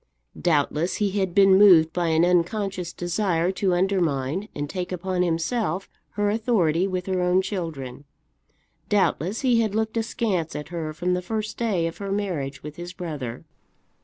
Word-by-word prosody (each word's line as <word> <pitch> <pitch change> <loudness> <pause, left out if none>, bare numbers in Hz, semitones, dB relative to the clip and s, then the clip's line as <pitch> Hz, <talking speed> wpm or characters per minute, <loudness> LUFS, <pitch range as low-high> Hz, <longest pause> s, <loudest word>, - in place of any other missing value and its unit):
Doubtless 160 +1 +1
he 205 -2 0
had 190 -3 -1
been 195 -1 +6
moved 170 -6 +7
by 175 -1 0
an 160 +1 +3
unconscious 180 0 0
desire 175 0 0
to 190 -1 0
undermine 175 -1 0
and 145 0 -3
take 180 +3 -4
upon 185 0 -2
himself 180 +2 -1 0.3
her 205 0 +1
authority 195 -6 +1
with 185 -1 -3
her 185 -1 -1
own 180 +1 +3
children. 155 -9 -5 0.8
Doubtless 200 0 +1
he 245 -3 +3
had 215 -2 -1
looked 220 +1 -1
askance 215 -7 -1
at 150 0 -6
her 165 -3 -4
from 175 +4 -1
the 180 - 0
first 215 +4 -3
day 205 -8 0
of 165 - -5
her 200 -1 -4
marriage 155 -10 -3
with 150 +1 -8
his 175 +1 -7
brother. 150 -10 -6
180 Hz, 160 wpm, -24 LUFS, 165-200 Hz, 0.8 s, moved